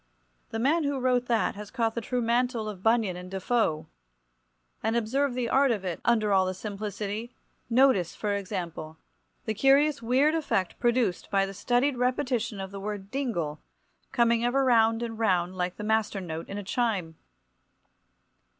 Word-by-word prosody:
The 225 - -4
man 295 +8 +2
who 285 -1 -1
wrote 250 -1 +1
that 230 -2 +1
has 210 0 -9
caught 225 -2 0
the 235 - -3
true 245 +2 -2
mantle 235 -1 0
of 200 -4 -6
Bunyan 225 -3 +2
and 180 0 -8
Defoe. 190 -4 0 1.0
And, 225 - 0
observe 245 +4 0
the 250 -2 -1
art 270 +3 +3
of 210 -5 -1
it, 175 -3 -3
under 215 -4 +2
all 190 -1 +4
the 185 - -3
simplicity—notice, 210 +1 -1
for 210 -1 -2
example, 175 -5 -5 0.5
the 220 - -1
curious 275 +5 +3
weird 260 +6 +3
effect 285 - -1
produced 235 -6 +1
by 195 -1 +2
the 195 - -7
studied 250 +6 +1
repetition 250 -4 -1
of 190 0 -5
the 200 - -7
word 200 -1 -6
"dingle" 195 - -2 0.5
coming 235 -1 +2
ever 265 +3 +2
round 225 -2 +3
and 225 -1 -5
round 185 -4 +1
like 180 0 -2
the - - -6
master 220 -1 0
note 165 -3 -6
in 200 - -5
a 205 - -4
chime. 195 -6 -1
225 Hz, 165 wpm, -27 LUFS, 195-245 Hz, 1.0 s, all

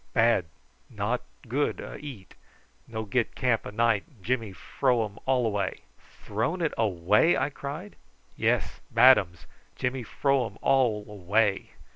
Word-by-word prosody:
Bad; 115 -6 +3 0.4
not - - -2 0.3
good - - 0
a - - -7
eat. 135 -10 -10 0.5
No 110 -1 -5
get 120 +2 -1
camp 125 -3 0
a - - -6
night. 115 -1 +2 0.2
Jimmy 115 -3 -1
fro 120 +5 0
um 105 -1 -10
all 130 -2 +2
away!" 105 -3 -1 0.4
"Thrown 110 - -1
it 165 -3 0
away!" 105 - +3
I 145 - 0
cried. 150 +9 -7 0.4
"Yes; - - 0
bad 130 -2 +7
ums. 85 -3 -8 0.3
Jimmy 125 +1 -2
fro 135 +3 +1
um 105 - -13
all 120 -6 +2
away!" 105 0 0
115 Hz, 140 wpm, -27 LUFS, 105-130 Hz, 0.5 s, bad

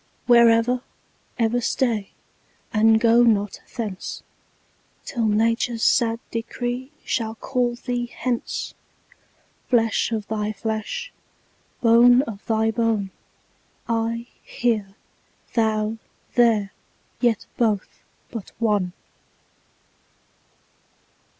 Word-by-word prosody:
Where 235 -1 +7
ever, 230 +2 +2 0.6
ever 235 +1 +1
stay, 235 -3 0 0.6
and 220 0 +5
go 230 +1 +5
not 210 -4 +2 0.2
thence, 210 -6 -5 0.8
Till 230 -4 -1
nature's 230 +2 +1
sad 230 -2 +3
decree 245 +3 -3 0.2
shall 225 -2 -1
call 245 0 -1
thee 245 0 -3
hence; 245 -1 -3 1.0
Flesh 230 -2 +2
of 215 -2 -2
thy 215 -1 -2
flesh, 220 - -4 0.7
bone 245 +2 +6
of 215 -6 -8
thy 220 0 +2
bone, 220 -4 0 0.8
I 230 0 -1 0.2
here, 215 -5 -1 0.6
thou 220 -1 +1 0.3
there, 225 -5 +3 0.5
yet 235 -4 +1
both 215 -5 0 0.3
but 225 -6 -7
one. 205 -6 +1
230 Hz, 90 wpm, -23 LUFS, 215-240 Hz, 1.0 s, Where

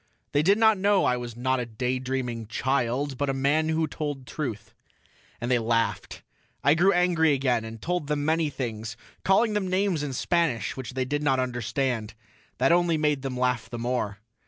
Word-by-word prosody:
They 145 - +3
did 195 +6 +4
not 220 -2 +4
know 200 0 +3
I 125 - +3
was 120 -2 -6
not 130 +1 +1
a 125 - -2
daydreaming 125 0 -3
child 130 +3 -1
but 145 -1 0
a 135 - 0
man 145 +4 +2
who 160 0 +1
told 145 -5 -4
truth. 125 -8 -5 0.7
And 120 +1 -2
they 125 - +4
laughed; 115 0 -1 0.4
I 145 - +5
grew 180 +5 +4
angry 175 -4 +3
again 130 -4 +1
and 115 0 -8
told 175 +2 -2
them 145 -1 -1
many 160 0 +2
things, 115 -4 -5 0.3
calling 215 +3 +3
them 205 -2 0
names 185 -3 +1
in 145 -2 -3
Spanish, 145 - 0
which 130 -1 -7
they 130 -1 0
did 145 +3 -1
not 135 -3 +2
understand. 120 -2 -2 0.4
That 130 +5 +3
only 170 -1 +3
made 150 -2 +1
them 130 -2 -4
laugh 125 -2 0
the 120 - -5
more. 115 -4 -2
135 Hz, 185 wpm, -26 LUFS, 120-160 Hz, 0.7 s, I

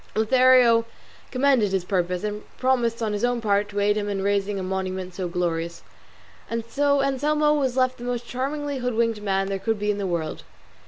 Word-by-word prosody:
Lothario 245 0 +5 0.4
commended 255 -6 +2
his 190 -2 0
purpose, 180 -1 -1
and 210 0 -3 0.2
promised 240 -3 +1
on 215 -1 -1
his 205 - -3
own 245 0 +1
part 205 -2 +1
to 205 0 -3
aid 205 +1 +2
him 205 -1 -2
in 195 -1 -2
raising 200 0 0
a 190 - -3
monument 185 -1 -3
so 185 -1 -3
glorious. 170 -1 -2 0.7
And 230 0 -3
so 280 +3 +1
Anselmo 300 +2 +2
was 265 -4 0
left 255 -1 +1
the - - -8
most 245 -1 -3
charmingly 280 +3 -3
hoodwinked 230 -3 0
man 195 -1 0
there 195 0 -2
could 225 +2 -1
be 210 0 0
in 205 - -3
the 195 - -2
world. 165 -3 -3
220 Hz, 195 wpm, -24 LUFS, 195-255 Hz, 0.7 s, Lothario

